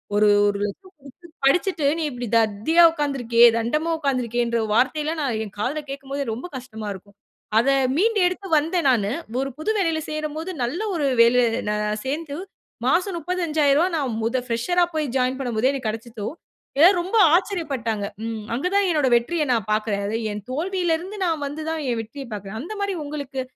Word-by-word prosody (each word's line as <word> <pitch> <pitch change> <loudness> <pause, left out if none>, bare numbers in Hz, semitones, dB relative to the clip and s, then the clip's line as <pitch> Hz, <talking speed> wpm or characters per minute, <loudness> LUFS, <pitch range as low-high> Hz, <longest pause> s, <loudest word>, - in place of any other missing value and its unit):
ஒரு, 210 0 +4 0.2
ரூ.100000 205 - -3
குடுத்து 275 +6 -15 0.2
படிச்சிட்டு 335 +2 +2
நீ 330 - -2
இப்பழடி 245 -3 -5
தத்தியா 225 +10 +3
உட்கார்ந்துருக்கியே 255 -7 +3
தண்டமா 305 +9 0
உட்கார்ந்துருக்கியேன்ற 240 -4 0
வார்த்தைல்லாம் 300 +7 +1
நான் 250 -6 -1
என் 205 - -12
காதுல 270 +8 -1
கேட்கும்போது 275 0 -4
ரொம்ப 240 +8 -6
கஷ்டமா 220 -4 -8
இருக்கும். 200 +1 -14 0.4
அத 245 +4 +2 0.3
மீண்டு 435 +4 +2
எடுத்து 370 +2 -4
வந்தேன் 325 0 +1
நானு. 215 -6 +2 0.3
ஒரு 275 - -2
புது 370 +8 0
வேலையில 330 -5 +1
சேரும் 305 -1 -3
போது 330 +4 -4
நல்ல 275 - -2
ஒரு 295 -4 0
வேலை 235 +2 +5 0.3
நான் 210 0 -1
சேர்ந்து 290 +2 -3 0.5
மாசம் 360 +5 +2
ரூ.35000 330 -1 +1
நான் 265 -7 -2
முத 230 +3 0
ஃபிரஷரா 260 +10 +1
போய் 310 -2 -1
ஜாயின் 255 +1 +1
பண்ணும் 245 -4 -3
போதே, 255 +5 +3
எனக்கு 270 -5 -4
கெடைச்சுச்சோ! 225 -1 -6 0.5
ஏ - - +10 0.2
ரொம்ப 370 +6 -4 0.2
ஆச்சரியபட்டாங்க. 275 - -1 0.2
ம் 225 -2 -5
அங்க 275 +9 -1
தான் 400 0 +4
என்னுடைய 295 -6 +2
வெற்றிய 300 +7 +1
நான் 225 -4 -1
பார்க்றேன். 215 -2 -1
அது 220 +2 -1
என் 205 -1 -6
தோல்வியில 350 +3 0
இருந்து 385 +4 -8
நான் 325 -4 -1
வந்து 300 +3 -6
தான் 320 -1 -2
என் 235 -2 0
வெற்றிய 265 +5 -9
பார்க்குறேன். 205 0 -6
அந்தமாரி 400 +4 -3
உங்களுக்கு 285 -2 -5
275 Hz, 170 wpm, -23 LUFS, 230-325 Hz, 0.5 s, ஏ